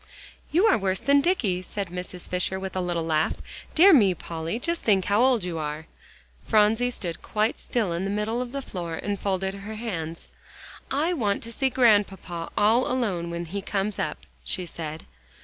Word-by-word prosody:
"You 355 +7 +4
are 225 - +5
worse 190 -1 0
than 280 +5 +4
Dicky," 225 - +1
said 195 0 -5
Mrs. 180 0 -5
Fisher 180 +1 -1
with 190 0 -5
a 185 - 0
little 175 -2 -1
laugh. 155 -1 +1 0.4
"Dear 370 +4 +8
me, 200 - +5
Polly, 165 +4 -4
just 335 +7 -1
think 195 -4 +3
how 205 +3 +3
old 250 -5 +4
you 175 -2 -3
are." 150 +1 -4 0.6
Phronsie 220 +3 +4
stood 175 -8 -5
quite 215 +1 0
still 215 -8 -1
in 170 +2 -2
the 195 - -1
middle 210 +4 -1
of 250 -1 -5
the 275 0 -4
floor 170 -6 -5
and 200 +4 -3
folded 190 -1 -1
her 200 +2 -7
hands. 170 -8 -5 0.6
"I 310 +6 +1
want 210 - 0
to 230 - -7
see 265 +2 +1
Grandpapa 205 -8 +2
all 225 +5 +4
alone 200 -10 -1
when 170 0 -4
he 195 +5 -4
comes 200 +1 -2
up," - - -1 0.3
she 185 - -3
said. 160 -2 -7
200 Hz, 185 wpm, -26 LUFS, 175-235 Hz, 0.6 s, Dear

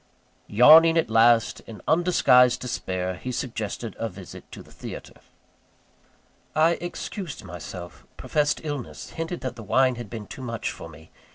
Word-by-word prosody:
Yawning 160 +9 +7
at 160 -9 +1
last, 115 0 +4
in 110 -2 -9
undisguised 145 -7 +4
despair, 95 -7 -3
he 125 - -5
suggested 115 -3 -4
a 115 - -2
visit 95 -2 -12
to - - -10
the - - -20
theatre. - - -10 1.3
I 160 +2 +4
excused 175 -1 -6
myself 90 -1 -9
professed 150 +1 0
illness 145 -5 -6
hinted 165 +2 -5
that 130 - -5
the - - -8
wine 130 +4 +2
had 120 -4 -7
been 110 -3 -7
too 130 - -10
much 115 -3 -4
for - - -10
me. 80 +2 -16
120 Hz, 150 wpm, -25 LUFS, 105-150 Hz, 1.3 s, Yawning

